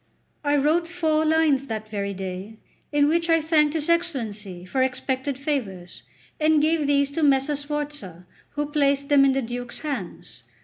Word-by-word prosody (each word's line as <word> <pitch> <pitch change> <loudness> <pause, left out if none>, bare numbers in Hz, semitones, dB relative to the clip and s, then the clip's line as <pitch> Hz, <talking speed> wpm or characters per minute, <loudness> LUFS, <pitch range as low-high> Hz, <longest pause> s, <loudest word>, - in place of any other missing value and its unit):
I 290 0 +2
wrote 310 +4 +2
four 320 -3 +1
lines 310 -4 +2
that 220 -2 -5
very 200 -2 -3
day, 190 +3 -6 0.3
in 290 -1 +3
which 335 +2 +1
I 330 0 +5
thanked 310 -1 +2
his 305 -2 -1
Excellency 220 - -2
for 260 +8 -1
expected 260 +1 -1
favours, 220 - -4 0.4
and 310 0 +4
gave 310 0 +1
these 280 -1 +2
to 325 - -2
Messer 280 0 +3
Sforza, 285 - -5 0.3
who 295 0 -1
placed 280 -1 +1
them 285 -1 +6
in 270 -1 +4
the 270 0 0
Duke's 245 +1 -5
hands. 250 - -6
280 Hz, 165 wpm, -24 LUFS, 230-305 Hz, 0.4 s, them